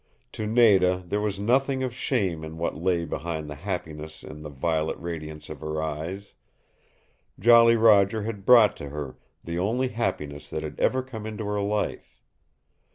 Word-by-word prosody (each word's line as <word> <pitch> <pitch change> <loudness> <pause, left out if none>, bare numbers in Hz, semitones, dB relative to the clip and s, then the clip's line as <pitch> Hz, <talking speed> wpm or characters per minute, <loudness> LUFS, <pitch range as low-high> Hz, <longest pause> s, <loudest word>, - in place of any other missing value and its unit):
To 110 - -4
Nada 95 -6 +4
there 100 +4 -1
was 105 -2 -2
nothing 130 +5 +1
of 125 -2 -2
shame 100 - -1
in 80 +1 -7
what 85 - -1
lay 85 -1 0
behind 80 -2 -4
the 75 - -6
happiness 80 -2 -6
in 75 - -10
the 75 - -7
violet 80 +2 -1
radiance 80 -3 -7
of 75 - -8
her 75 +1 -3
eyes. 80 +6 -5 1.1
Jolly 115 +2 +7
Roger 110 -2 +4
had 105 -2 -5
brought 115 -2 +6
to 70 - -7
her 75 -2 -6 0.2
the 85 +1 -4
only 120 +7 0
happiness 75 -11 -3
that - - -4
had - - -7
ever 130 0 +2
come 110 -5 -7
into 110 0 -5
her 105 0 -1
life. 105 +1 -3
95 Hz, 165 wpm, -26 LUFS, 80-110 Hz, 1.1 s, Jolly